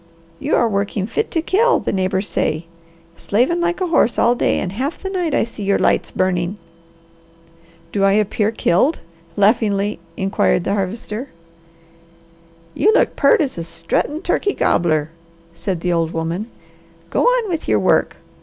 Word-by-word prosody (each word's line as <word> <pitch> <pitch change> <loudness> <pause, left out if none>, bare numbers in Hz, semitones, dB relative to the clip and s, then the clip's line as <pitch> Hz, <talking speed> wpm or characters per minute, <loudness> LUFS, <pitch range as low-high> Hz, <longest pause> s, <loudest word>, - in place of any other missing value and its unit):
"You - - 0
are 235 - +3
working 200 -1 -1
fit 445 - -2
to 325 - -1
kill, 460 +8 +3
the - - -3
neighbours 190 +1 0
say. 155 +2 -1 0.5
Slavin' 255 - 0
like 345 +2 -1
a - - +2
horse 325 -8 +2
all 235 - +4
day, 245 - +1
and 180 - -2
half 265 - -3
the 385 - -6
night 350 -6 -1
I - - +3
see 230 -2 -8
your 200 0 +2
lights - - +1
burning." 185 +1 -1 1.3
"Do 200 - 0
I 195 0 +4
appear 210 0 +1
killed?" 225 - +1 0.4
laughingly 205 -1 +2 0.2
inquired 190 -2 +1
the 195 - -1
Harvester. 210 +5 -4 1.4
"You 430 - +3
look - - +2
peart 280 - +4
as 265 - -2
a - - -3
struttin' 165 - -2
turkey 405 - 0
gobbler," 155 -3 +1 0.4
said 180 -1 -4
the 175 0 0
old 165 -1 0
woman. 165 +6 -3 0.6
"Go - - +1
on - - +3
with 330 -3 -3
your - - +3
work! - - +2
205 Hz, 160 wpm, -19 LUFS, 185-290 Hz, 1.4 s, all